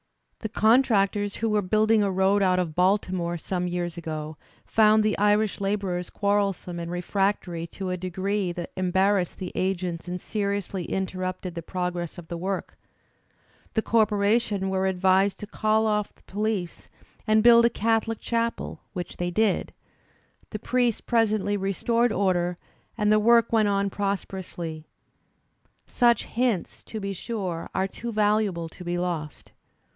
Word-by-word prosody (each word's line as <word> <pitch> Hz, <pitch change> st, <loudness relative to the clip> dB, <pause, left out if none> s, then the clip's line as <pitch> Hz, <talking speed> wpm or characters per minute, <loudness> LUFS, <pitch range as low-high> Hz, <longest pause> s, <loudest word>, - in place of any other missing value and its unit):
The 220 Hz, -, -4 dB
contractors 210 Hz, -3 st, +3 dB
who 225 Hz, -, -1 dB
were 210 Hz, -1 st, +2 dB
building 215 Hz, +3 st, +3 dB
a 200 Hz, -, +2 dB
road 190 Hz, +2 st, +2 dB
out 185 Hz, -1 st, +3 dB
of 175 Hz, -4 st, -1 dB
Baltimore, 180 Hz, -1 st, +1 dB
some 180 Hz, +2 st, -2 dB
years 175 Hz, -1 st, -3 dB
ago, 155 Hz, -2 st, -5 dB, 0.3 s
found 215 Hz, 0 st, +4 dB
the 215 Hz, 0 st, +1 dB
Irish 210 Hz, 0 st, +2 dB
labourers 195 Hz, -3 st, -1 dB
quarrelsome 200 Hz, -4 st, -1 dB
and 170 Hz, 0 st, -5 dB
refractory 175 Hz, -1 st, -1 dB
to 185 Hz, +1 st, -5 dB
a 180 Hz, -, -2 dB
degree 185 Hz, +1 st, -2 dB
that 175 Hz, -1 st, -6 dB
embarrassed 190 Hz, 0 st, +1 dB
the 185 Hz, -, -5 dB
agents 180 Hz, -2 st, -2 dB
and 180 Hz, 0 st, -4 dB
seriously 200 Hz, -3 st, -2 dB
interrupted 185 Hz, -1 st, -3 dB
the 170 Hz, -, -5 dB
prog 180 Hz, +1 st, -3 dB
ress 175 Hz, -1 st, -5 dB
of 175 Hz, -2 st, -10 dB
the 170 Hz, -, -4 dB
work. 190 Hz, +2 st, -3 dB, 1.0 s
The 220 Hz, -, +2 dB
corporation 210 Hz, -2 st, +2 dB
were 190 Hz, 0 st, +1 dB
advised 190 Hz, +1 st, +2 dB
to -, -, -4 dB
call 215 Hz, +1 st, +1 dB
oflF 210 Hz, -1 st, +1 dB
the -, -, -28 dB
police 205 Hz, -3 st, -3 dB, 0.4 s
and 215 Hz, 0 st, +4 dB
build 235 Hz, 0 st, +7 dB
a -, -, +5 dB
Catholic 225 Hz, 0 st, 0 dB
chapel, 230 Hz, 0 st, -2 dB
which 180 Hz, -3 st, -6 dB
they 175 Hz, 0 st, -1 dB
did; 210 Hz, +2 st, +1 dB, 0.8 s
the 215 Hz, -, -4 dB
priest 240 Hz, +1 st, 0 dB
presently 215 Hz, -3 st, +1 dB
restored 230 Hz, +5 st, +1 dB
order, 180 Hz, -4 st, +1 dB, 0.4 s
and 210 Hz, -1 st, +2 dB
the 215 Hz, -, +5 dB
work 230 Hz, +1 st, +4 dB
went 220 Hz, -2 st, +4 dB
on 200 Hz, -1 st, +1 dB
pros 200 Hz, 0 st, -1 dB
perously. 170 Hz, -4 st, -7 dB, 1.0 s
Such 240 Hz, -1 st, +2 dB
hints, 230 Hz, -7 st, -1 dB
be 200 Hz, -3 st, -4 dB
sure, 185 Hz, -5 st, -4 dB
are 190 Hz, 0 st, +1 dB
too 235 Hz, +4 st, -6 dB
valuable 210 Hz, -5 st, +1 dB
to 180 Hz, -, -12 dB
be 175 Hz, 0 st, -2 dB
lost. 170 Hz, -4 st, -4 dB
195 Hz, 150 wpm, -26 LUFS, 180-215 Hz, 1.0 s, build